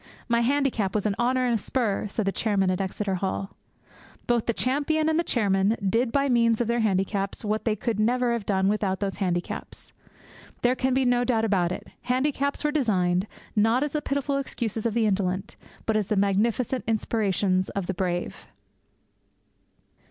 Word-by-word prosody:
'My 235 Hz, 0 st, +2 dB
handicap 245 Hz, -6 st, +1 dB
was 210 Hz, -, 0 dB
an 210 Hz, -, +2 dB
honour 255 Hz, +1 st, +2 dB
and 245 Hz, -, +1 dB
a -, -, +3 dB
spur!' 220 Hz, -5 st, -1 dB
said 215 Hz, +1 st, -2 dB
the 195 Hz, -, +1 dB
chairman 195 Hz, -3 st, +1 dB
at 185 Hz, -, -1 dB
Exeter 195 Hz, +1 st, -2 dB
Hall. 195 Hz, +1 st, -2 dB, 0.7 s
Both 240 Hz, -2 st, +1 dB
the -, -, +3 dB
champion 295 Hz, +6 st, 0 dB
and 320 Hz, +1 st, +2 dB
the -, -, +2 dB
chairman 205 Hz, -, +1 dB
did 230 Hz, +4 st, +1 dB
by 280 Hz, +1 st, +2 dB
means 230 Hz, -3 st, +3 dB
of 240 Hz, -, +1 dB
their 235 Hz, +1 st, +1 dB
handicaps 195 Hz, 0 st, -1 dB
what 215 Hz, +1 st, -1 dB
they 220 Hz, -2 st, +2 dB
could 215 Hz, 0 st, -2 dB
never 240 Hz, +2 st, +2 dB
have 235 Hz, -3 st, -2 dB
done 190 Hz, -1 st, +2 dB
without 200 Hz, -2 st, 0 dB
those 195 Hz, -1 st, -2 dB
handicaps. 175 Hz, -3 st, -4 dB, 0.7 s
There 245 Hz, +1 st, +4 dB
can 260 Hz, 0 st, 0 dB
be 265 Hz, 0 st, +2 dB
no 245 Hz, 0 st, +3 dB
doubt 230 Hz, -3 st, +1 dB
about 185 Hz, -5 st, +1 dB
it; -, -, -6 dB
handicaps 280 Hz, +3 st, 0 dB
were 300 Hz, -, +1 dB
designed, 190 Hz, -9 st, +1 dB, 0.3 s
not 225 Hz, +5 st, +3 dB
as 295 Hz, -, -2 dB
the 300 Hz, -, -1 dB
pitiful 280 Hz, 0 st, -1 dB
excuses 230 Hz, -5 st, -2 dB
of 225 Hz, -, -3 dB
the 230 Hz, -2 st, +2 dB
indolent, 190 Hz, -2 st, -1 dB, 0.3 s
but 220 Hz, -, +1 dB
as 210 Hz, -3 st, +1 dB
the 215 Hz, -, 0 dB
magnificent 215 Hz, +6 st, +1 dB
inspirations 200 Hz, -4 st, +1 dB
of 200 Hz, -2 st, -3 dB
the 190 Hz, -, -2 dB
brave. 175 Hz, -1 st, -3 dB
220 Hz, 180 wpm, -26 LUFS, 195-250 Hz, 0.7 s, There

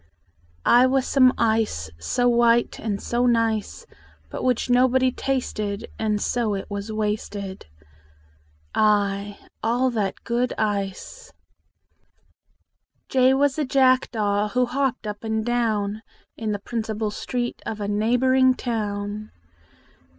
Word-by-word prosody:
I 245 Hz, +2 st, +6 dB
was 265 Hz, 0 st, +1 dB
some 255 Hz, -2 st, +5 dB
ice 220 Hz, -, 0 dB
So 245 Hz, -, 0 dB
white 235 Hz, 0 st, +3 dB
and 205 Hz, -3 st, -3 dB
so 240 Hz, +3 st, 0 dB
nice, 230 Hz, -, 0 dB, 0.5 s
But -, -, -5 dB
which 250 Hz, -2 st, +1 dB
nobody 255 Hz, +1 st, +3 dB
tasted; 215 Hz, -7 st, -3 dB
And 215 Hz, -1 st, 0 dB
so 225 Hz, -2 st, 0 dB
it 195 Hz, -, -4 dB
was 200 Hz, +2 st, -4 dB
wasted. 210 Hz, -, -4 dB, 1.1 s
i 205 Hz, -1 st, +1 dB, 0.2 s
All 245 Hz, +3 st, +1 dB
that 210 Hz, -5 st, -2 dB
good 240 Hz, +1 st, 0 dB
ice! 210 Hz, -, -3 dB, 1.8 s
J 260 Hz, 0 st, +4 dB
was 280 Hz, +1 st, +1 dB
a -, -, +2 dB
jackdaw 240 Hz, -6 st, +2 dB
Who 250 Hz, 0 st, +3 dB
hopped 260 Hz, -1 st, -1 dB
up 210 Hz, 0 st, -6 dB
and 220 Hz, -1 st, -1 dB
dowa 220 Hz, -3 st, 0 dB, 0.3 s
In 220 Hz, -1 st, -3 dB
the 205 Hz, -, -1 dB
principal 220 Hz, 0 st, -3 dB
street 240 Hz, +3 st, -4 dB
Of 215 Hz, -, -4 dB
a 205 Hz, -, -3 dB
neighboring 255 Hz, +5 st, +3 dB
town. 210 Hz, -3 st, -3 dB
225 Hz, 120 wpm, -23 LUFS, 210-250 Hz, 1.8 s, I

